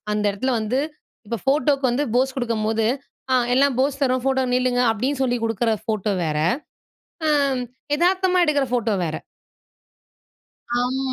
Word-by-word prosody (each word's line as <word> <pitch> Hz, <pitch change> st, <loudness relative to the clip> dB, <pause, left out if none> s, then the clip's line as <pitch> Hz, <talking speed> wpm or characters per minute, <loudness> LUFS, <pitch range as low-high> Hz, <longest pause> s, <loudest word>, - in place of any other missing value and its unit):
அந்த 210 Hz, 0 st, -1 dB
எடத்தல 260 Hz, +7 st, -1 dB
வந்து 220 Hz, +5 st, -1 dB, 0.5 s
இப்போ 230 Hz, +2 st, -3 dB
ஃபோட்டோக்கு 275 Hz, 0 st, +2 dB
வந்து 260 Hz, +5 st, 0 dB
போஸ் 265 Hz, +1 st, +1 dB
குடுக்கும்போது 225 Hz, -3 st, 0 dB, 0.5 s
"ஆ -, -, +5 dB, 0.2 s
எல்லாம் 275 Hz, 0 st, +3 dB
போஸ் 275 Hz, +1 st, 0 dB
தரோம் 255 Hz, -2 st, +2 dB
ஃபோட்டோல 265 Hz, -1 st, +1 dB
நில்லுங்க" 250 Hz, -1 st, +1 dB
அப்படின்னு 255 Hz, +6 st, -2 dB
சொல்லி 245 Hz, -1 st, 0 dB
குடுக்குற 225 Hz, 0 st, 0 dB
ஃபோட்டோ 215 Hz, -3 st, -1 dB
வேற! 155 Hz, -1 st, -1 dB, 0.9 s
அம் 280 Hz, -4 st, +2 dB, 0.3 s
எதார்த்தமா 365 Hz, +2 st, +2 dB
எடுக்கிற 290 Hz, -3 st, +2 dB
ஃபோட்டோ 230 Hz, -3 st, +1 dB
வேற. 160 Hz, -2 st, -3 dB, 1.7 s
ஆமா. 260 Hz, +1 st, -1 dB
255 Hz, 135 wpm, -22 LUFS, 225-275 Hz, 1.7 s, ஆ